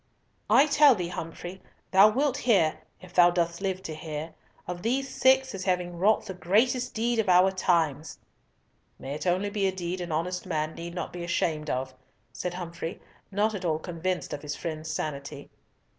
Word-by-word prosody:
"I 275 - +7
tell 290 -3 +6
thee, 175 -4 -3
Humfrey, 175 +2 -7 0.3
thou 195 +2 +8
wilt 270 +4 +1
hear—if 175 - 0
thou 175 -1 +7
dost 170 0 -1
live 190 -1 -2
to 160 - -5
hear—of 160 +3 -8
these 260 +6 0
six 265 0 +3
as 190 -1 -5
having 180 -2 0
wrought 200 +5 +2
the 195 - -5
greatest 220 +9 +1
deed 235 +1 0
of 215 - +1
our 180 +1 +6
times!" 165 -5 0 0.8
"May 135 +1 -6
it 155 +5 -4
only 185 +3 +1
be 200 -2 +1
a - - +1
deed 180 0 -4
an 175 -1 -5
honest 180 +4 -2
man 155 -2 -1
need 170 +1 -7
not 175 - -4
be 175 -1 -5
ashamed 160 -3 -1
of," 130 +1 -2 0.4
said 180 +6 -4
Humfrey, 170 -1 -6 0.3
not 210 +3 +1
at 200 -2 -5
all 160 -3 +1
convinced 175 +2 -3
of 145 - -5
his 145 -1 -4
friend's 160 -2 -5
sanity. 145 -2 -5
180 Hz, 175 wpm, -27 LUFS, 160-200 Hz, 0.8 s, thou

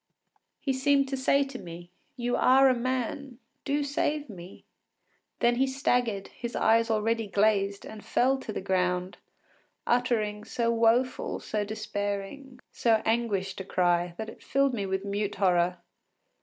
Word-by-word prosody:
He 270 - -1
seemed 275 +1 +2
to 270 - -1
say 275 +1 +2
to 275 -2 -8
me, 175 0 -10 0.2
“You 245 -1 -1
are 265 +1 +5
a - - +4
man; 255 +1 -3 0.3
do 290 +1 0
save 285 -1 -1
me.” 180 -1 -12 0.8
Then 240 0 +3
he 265 +1 +2
staggered, 245 -6 0
his 235 -1 -7
eyes 230 +1 +3
already 225 0 0
glazed, 200 -1 +1
and 215 -1 -10
fell 265 +2 +2
to 225 - -6
the - - -4
ground, 180 -1 -1 0.7
uttering 225 -4 0
so 235 +1 -1
woeful, 235 +3 +1
so 210 -1 -2
despairing, 210 +5 -5
so 225 -2 +2
anguished 205 -5 -1
a - - -5
cry 175 -2 +1
that 220 - -5
it - - -13
filled 275 -1 +1
me 200 -4 -2
with 190 +1 -2
mute 205 0 -2
horror. 180 -2 +2
225 Hz, 150 wpm, -28 LUFS, 200-255 Hz, 0.8 s, are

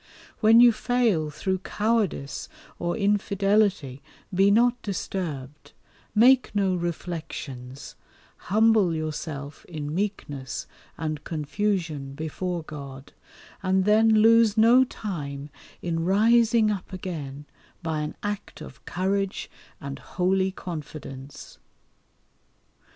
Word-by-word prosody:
When 225 +1 +6
you 240 0 +8
fail 225 -9 +1
through 190 +5 -2
cowardice 205 -9 -1 0.3
or 175 0 -1
infidelity 200 - +1 0.3
be 195 +2 +4
not 240 +3 +3
disturbed, 155 -8 -5 0.4
make 250 +2 +5
no 195 -2 +2
reflections, 155 -7 -5 0.5
humble 215 -4 +4
yourself 155 -2 -5
in 150 -3 -5
meekness 145 - -3 0.3
and 155 -2 -3
confusion 160 -3 -2
before 170 +3 -3
God, 140 -3 -9 0.5
and 190 0 +2
then 215 +2 +5
lose 230 -1 +5
no 235 +4 +7
time 150 - -6 0.3
in 165 -1 -1
rising 220 +3 +4
up 200 -2 -5
again 150 -7 -6 0.4
by 160 -2 -1
an 150 0 -4
act 205 0 -4
of - - -11
courage 195 +2 -2 0.3
and 140 -4 -6
holy 190 +1 0
confidence. 150 -6 -8
185 Hz, 100 wpm, -26 LUFS, 150-210 Hz, 0.5 s, you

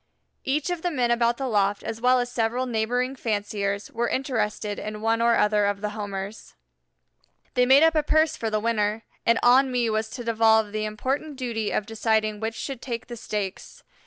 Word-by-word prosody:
Each 295 +5 -1
of 350 -2 -3
the 355 - 0
men 250 -7 0
about 235 0 +2
the 270 - -2
loft 205 -3 +1
as 225 0 -5
well 250 +1 +4
as 245 0 -2
several 240 +1 0
neighboring 245 +3 -1
fanciers 205 -3 -2
were 235 +1 -1
interested 215 -5 -2
in 215 0 -5
one 225 +1 +1
or 235 0 +4
other 210 -1 +3
of 200 0 -2
the 210 -1 -2
Homers. 205 0 -6 1.0
They 250 0 +3
made 270 +4 +7
up 325 0 +5
a 310 - +3
purse 315 +1 +2
for 225 - -3
the 215 0 0
winner, 215 -1 0 0.2
and 230 0 +5
on 260 +2 +5
me 240 -2 +1
was 220 0 -1
to 245 - -6
devolve 220 -2 +3
the 215 0 -2
important 265 +8 -3
duty 235 -5 -2
of 210 - -1
deciding 220 -1 0
which 225 +1 -3
should 270 -1 -5
take 240 -2 -5
the 240 - -8
stakes. 205 -4 -5
225 Hz, 195 wpm, -25 LUFS, 215-250 Hz, 1.0 s, made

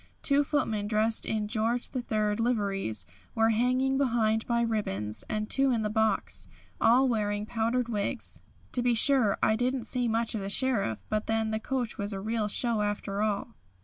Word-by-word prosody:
Two 280 0 +4
footmen 225 -8 -1
dressed 220 +1 +1
in 215 -1 -1
George 230 +2 0
III. 215 -4 0
liveries 200 - 0 0.3
were 225 0 +3
hanging 255 +4 +1
behind 225 -4 +1
by 235 -1 +1
ribbons, 110 - -1
and 215 0 -2
two 270 +3 +2
on 230 -3 0
the 210 - -1
box, 220 0 0 0.3
all 250 +4 +5
wearing 210 -3 0
powdered 235 +2 0
wigs. 220 +2 -3 0.3
To 250 - 0
be 240 -1 +2
sure, 240 -4 +4
I 220 - +4
didn't 250 +2 0
see 245 +1 -1
much 230 0 0
of 220 - -2
the 195 - -4
Sheriff, 200 - 0
but 215 0 -2
then 225 0 0
the 220 - -1
coach 245 0 -3
was 200 0 -2
the 195 -2 -4
real 215 +1 -1
show 225 +1 +1
after 205 -1 -2
all." 210 +1 -1
220 Hz, 180 wpm, -29 LUFS, 210-245 Hz, 0.3 s, all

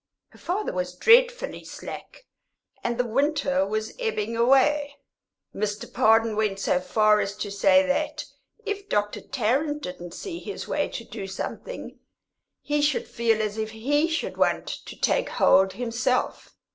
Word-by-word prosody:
Her - - -19
father 385 +5 -2
was 180 0 -3
dreadfully - - +4
slack, - - -9 0.6
and 235 -1 -1
the 245 - +1
winter 275 -1 +1
was 215 +1 -3
ebbing 230 - -2
away. 275 +4 +3 0.6
Mr. 210 0 -4
Pardon 225 0 +4
went 210 -2 0
so 180 - +1
far 215 +2 +3
as 200 0 -2
to 205 - -4
say 280 +8 +4
that 275 0 -1 0.4
if 410 -1 -4
Dr. 205 0 0
Tarrant 280 +5 -1
didn't 175 -1 -7
see 345 -4 -6
his 410 - -7
way - - 0
to 230 - -6
do 215 -3 -7
something, 195 - -6 0.6
he 295 0 0
should 290 -1 +1
feel 225 -2 +1
as 215 +1 -3
if 220 0 -2
he 280 +8 +1
should 325 -1 -3
want - - +1 0.2
to - - -10
take - - +1
hold 190 0 +4
himself. 245 +3 -2
235 Hz, 150 wpm, -25 LUFS, 210-295 Hz, 0.6 s, dreadfully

